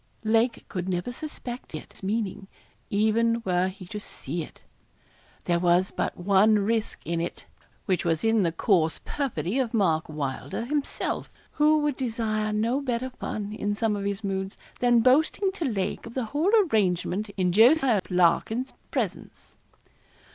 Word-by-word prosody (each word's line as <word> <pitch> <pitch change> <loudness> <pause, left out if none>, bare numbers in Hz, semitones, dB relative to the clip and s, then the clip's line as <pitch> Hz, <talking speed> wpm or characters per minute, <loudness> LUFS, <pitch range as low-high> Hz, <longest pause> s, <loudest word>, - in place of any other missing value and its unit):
Lake 225 +2 +1
could 185 -1 -4
never 180 +6 -2
suspect 250 - -7
its 155 - -10
meaning, 200 -1 -2 0.4
even 230 +3 +2
were 180 0 +2
he 190 0 -8
to 210 +4 -6
see 170 -4 -5
it. - - -10 0.8
There 175 -1 +1
was 175 +2 +3
but - - -2
one 200 +4 +4
risk 220 +2 -1
in 165 +1 -1
it, 170 - -5 0.4
which 185 -3 +1
was 165 -2 0
in 225 -1 +3
the 170 -3 +2
coarse 165 -2 +2
perfidy 265 - -2
of 245 -3 -1
Mark 165 -8 +2
Welder 145 - -4
himself, 285 +2 -2 0.2
who 305 +1 +4
would 295 -3 0
desire 220 -3 -1
no 230 +6 +1
better 255 -1 -2
fun, 210 -3 -5
in 205 -1 -2
some 220 0 0
of 200 -1 -4
his 200 +1 -2
moods, 190 0 -3 0.2
than 240 -1 +4
boasting 310 - +3
to 365 -4 -4
Lake 210 -4 -2
of 230 - -11
the 255 -3 -1
whole 320 +7 +2
arrangement 205 - 0
in 180 -2 +2
Jos. 240 - +6 0.3
Larkin's 185 +8 +2 0.2
presence. - - -4
215 Hz, 155 wpm, -26 LUFS, 185-240 Hz, 0.8 s, Jos